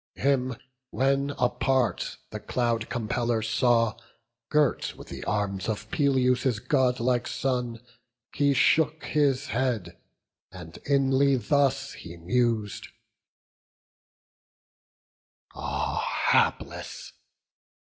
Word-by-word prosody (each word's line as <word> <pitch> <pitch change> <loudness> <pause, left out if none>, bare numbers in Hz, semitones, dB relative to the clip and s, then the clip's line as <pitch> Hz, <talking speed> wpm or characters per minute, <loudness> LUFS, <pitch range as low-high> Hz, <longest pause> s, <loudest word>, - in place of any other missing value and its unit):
Him 130 -2 +1 0.3
when 135 +2 +1
apart 125 0 0
the - - -5
Cloud 115 -2 -1
compeller 115 -1 -1
saw 115 0 +2 0.5
Girt 150 -3 +1
with - - -12
the - - -7
arms 100 -1 -1
of 110 - -4
Peleus' 130 -6 +2
godlike 125 -1 +1
son, 125 -3 -2 0.5
He 140 -1 +2
shook 155 +3 +3
his 140 -3 +1
head, 115 -7 -1 0.6
and 80 +1 -10
inly 135 0 +3
thus 140 +4 +1
he 85 0 -10
mus'd: 110 +3 -1 2.7
"Ah - - -2
hapless! - - 0
125 Hz, 85 wpm, -27 LUFS, 115-135 Hz, 2.7 s, shook